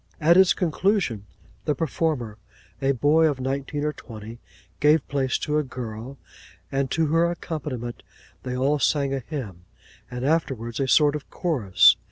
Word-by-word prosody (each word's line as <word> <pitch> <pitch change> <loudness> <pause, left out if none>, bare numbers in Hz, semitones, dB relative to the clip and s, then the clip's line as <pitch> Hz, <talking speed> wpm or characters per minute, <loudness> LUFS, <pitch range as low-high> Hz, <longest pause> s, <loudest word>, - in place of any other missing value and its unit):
At 165 +2 +5
its 190 0 +6
conclusion, 175 - 0 0.4
the 150 - +1
performer, 135 -8 -2 0.4
a 135 0 +2
boy 150 +5 +4
of 145 -4 -1
nineteen 140 +3 -2
or 150 - -1
twenty, 115 -3 -10 0.4
gave 150 0 +4
place 135 -2 0
to 150 0 0
a - - 0
girl; 120 0 -7 0.5
and 135 -1 0
to 160 - +1
her 170 +1 +4
accompaniment 145 -8 -5 0.4
they 125 -1 -4
all 140 +3 +1
sang 140 0 +1
a 135 - -1
hymn, 115 - -7 0.4
and 125 +1 -4
afterwards 130 -7 -1
a 135 - 0
sort 145 +2 +4
of 150 - -7
chorus. 130 - +4
140 Hz, 155 wpm, -24 LUFS, 125-155 Hz, 0.5 s, its